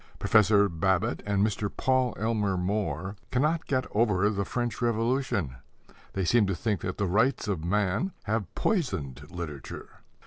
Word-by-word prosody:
Professor 105 -1 +4
Babbitt 95 +6 0
and 100 0 +2
Mr. 105 -1 -1
Paul 130 +1 +1
Elmer 105 -4 0
More 95 -1 -2
cannot 155 +6 +1
get 130 -2 0
over 105 -2 +2
the 100 -1 -1
French 120 -1 -3
Revolution. 115 - 0 0.6
They 95 -1 -1
seem 110 +2 +4
to 95 - 0
think 105 -1 -1
that 95 - -4
the 100 - 0
rights 110 +6 +2
of 95 -6 -2
man 105 - 0
have 105 -4 -2
poisoned 75 - -1
literature. 85 -7 -7
105 Hz, 145 wpm, -28 LUFS, 90-115 Hz, 0.6 s, Professor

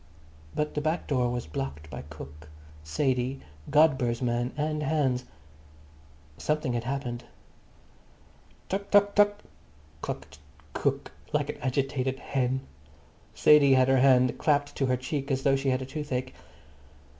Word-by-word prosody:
But 150 0 -1
the 150 - -1
back 160 +3 -1
door 125 -4 +1
was 120 0 -3
blocked 75 0 -5
by 70 - -6
cook, 75 -1 -11 0.3
Sadie, 130 - 0 0.3
Godber's 130 -6 +3
man 120 0 0
and 150 0 -1
Hans. 135 -4 0 1.1
Something 150 -4 0
had 120 0 -2
happened. 125 -2 -3 1.4
"Tuk 200 +1 -3
tuk 205 0 +5
tuk," 205 0 +3 0.6
clucked 75 - -6 0.3
cook - - -1 0.2
like - - +1
an - - -13
agitated 130 0 -1
hen. 130 -1 -1 0.7
Sadie 145 -3 +6
had 130 0 +4
her 135 -1 +4
hand 130 -1 +4
clapped 145 -1 +1
to 135 - +1
her 125 0 +2
cheek 135 +2 -4
as 135 -1 0
though 135 -1 +4
she 135 0 0
had 130 0 -1
toothache. 130 -3 -4
135 Hz, 135 wpm, -28 LUFS, 125-150 Hz, 1.4 s, Sadie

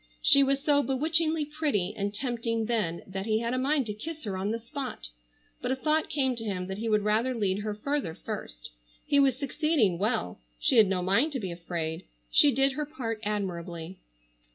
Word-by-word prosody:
She 280 - +7
was 275 0 +2
so 290 -1 +4
bewitchingly 310 +3 +1
pretty 290 - -1
and 200 0 -2
tempting 230 0 -2
then 210 -8 -1
that 190 +2 -5
he 215 -1 +2
had 235 +1 -1
a 255 - 0
mind 275 +1 +1
to 210 - -3
kiss 310 +9 -7
her 200 -4 -3
on 190 +2 -2
the 225 - 0
spot, 230 - -6 0.5
but 250 - -2
a - - +2
thought 305 +3 +1
came 265 -3 +1
to 225 - -5
him 190 -4 -2
that 190 +2 -5
he 225 +1 -2
would 210 -1 +3
rather 225 +5 +1
lead 200 -3 0
her 210 0 -3
further 260 - -2
first. - - -7 0.3
He 285 - +3
was 270 -3 +4
succeeding 280 - +1
well. 205 - -1 0.2
She - - +2
had 215 -3 +8
no 185 -1 0
mind 230 - +2
to 265 - -1
be 190 -5 -4
afraid. 170 -2 -4 0.3
She 290 - +6
did 270 +1 +3
her 300 +2 -3
part 240 -8 -4
admirably. 180 -4 -4
225 Hz, 200 wpm, -28 LUFS, 195-280 Hz, 0.5 s, had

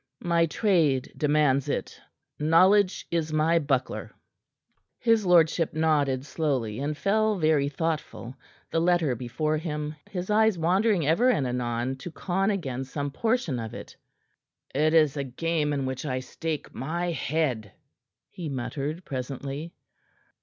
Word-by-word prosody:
"My 170 -1 +2
trade 155 - +1
demands 145 -3 +2
it. - - -3 0.4
Knowledge 185 +6 +4
is 165 -2 -1
my 160 +2 +3
buckler." 135 -4 -1 0.9
His 225 -4 +2
lordship 165 -2 +3
nodded 145 -4 +1
slowly, 130 -9 -1
and 145 +2 -2
fell 215 +6 +1
very 155 -4 +2
thoughtful, 145 -7 -3 0.4
the 165 - +1
letter 170 -5 +2
before 130 +6 -2
him, 150 -1 -4
his 185 +1 -4
eyes 220 -2 +4
wandering 185 +2 +2
ever 170 - +3
and 150 - +2
anon 125 +1 -2
to 130 - -7
con 190 +4 -1
again 135 -11 -2
some 140 +1 -4
portion 220 - 0
of 110 -1 -6
it. - - -9 0.8
"It 155 +3 +2
is 155 -3 +4
a 140 - -1
game 150 +3 -1
in 140 -2 -1
which 130 0 -4
I 130 -4 -2
stake 155 +4 -5
my 170 +7 -2
head," 135 - -1 0.6
he 170 -4 -6
muttered 145 +5 -4
presently. 140 +4 -5
155 Hz, 135 wpm, -27 LUFS, 135-170 Hz, 0.9 s, Knowledge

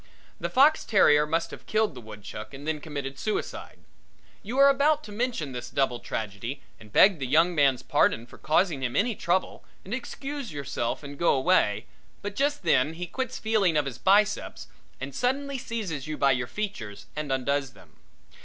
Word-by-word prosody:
The - - -2
fox 290 +4 +5
terrier 150 -8 +4
must 165 +2 -1
have - - -11
killed 215 -4 +1
the 125 - -9
woodchuck 110 +3 -9
and 145 +3 -9
then 155 -1 -1
committed 140 -3 -5
suicide. 215 - -4 0.6
You 235 +6 -5
are 275 0 +8
about 290 +2 +3
to 210 - -10
mention 215 - -2
this 120 -1 -6
double 125 -3 0
tragedy 110 +6 -5 0.2
and 105 -1 -15
beg 195 - +6
the 135 - -2
young 165 +6 +4
man's 140 -5 +3
pardon 115 - +2
for - - -16
causing 155 0 +1
him 125 -2 -2
any 230 +3 +2
trouble 185 -1 -1 0.2
and 195 - -6
excuse 270 -1 -5
yourself 140 -3 -3
and 145 0 -9
go 170 - +4
away, 130 - +2 0.4
but 205 0 -4
just 285 -1 0
then 150 -2 +3
he 180 +2 -4
quits 260 +6 -4
feeling 205 -7 +2
of 150 - +2
his 130 -5 -6
biceps 205 +2 +2 0.3
and 135 +1 -6
suddenly 270 - -1
seizes 190 - -4
you 155 -1 -4
by 140 - +4
your 125 -2 0
features 125 - -5
and 150 -2 -3
undoes 135 0 0
them. - - -19
155 Hz, 180 wpm, -27 LUFS, 135-215 Hz, 0.6 s, are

